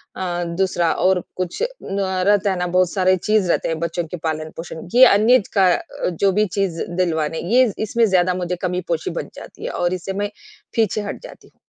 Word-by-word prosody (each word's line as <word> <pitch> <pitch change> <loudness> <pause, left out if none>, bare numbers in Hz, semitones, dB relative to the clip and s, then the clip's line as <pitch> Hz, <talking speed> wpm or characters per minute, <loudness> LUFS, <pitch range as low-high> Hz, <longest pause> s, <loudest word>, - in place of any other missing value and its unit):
अ, 175 -2 -2
दूसरा 185 -3 +1
और 185 0 +2
कुछ 185 - -3 0.2
न 195 +1 -3 0.3
रहता 205 -1 +3
है 190 - -2
ना 180 - -1
बहुत 180 0 +2
सारे 185 -1 +3
चीज़ 210 0 +1
रहते - - +1
हैं 165 -1 -2
बच्चों 170 +1 -2
के 180 - -6
पालन-पोषण, 160 +1 -5
ये 255 +1 +9
अन्य 230 +3 +5
का 190 -3 +4
अ, - - -4
जो 195 +3 +1
भी 210 +3 +2
चीज़ 190 -4 -1 0.2
दिलवाने 160 -3 0
ये 250 -2 +5
इसमें 230 +2 +2
ज़्यादा 185 -3 +2
मुझे 180 0 -2
कमी-पोशी 180 -3 -2
बन - - -4
जाती - - -11
है - - -2
और 175 0 -1
इससे 185 +1 -4
मैं 205 +1 -2 0.5
पीछे 220 -2 +1
हट 205 - -6
जाती - - -12
हूँ। - - -41
185 Hz, 200 wpm, -20 LUFS, 175-200 Hz, 0.5 s, ये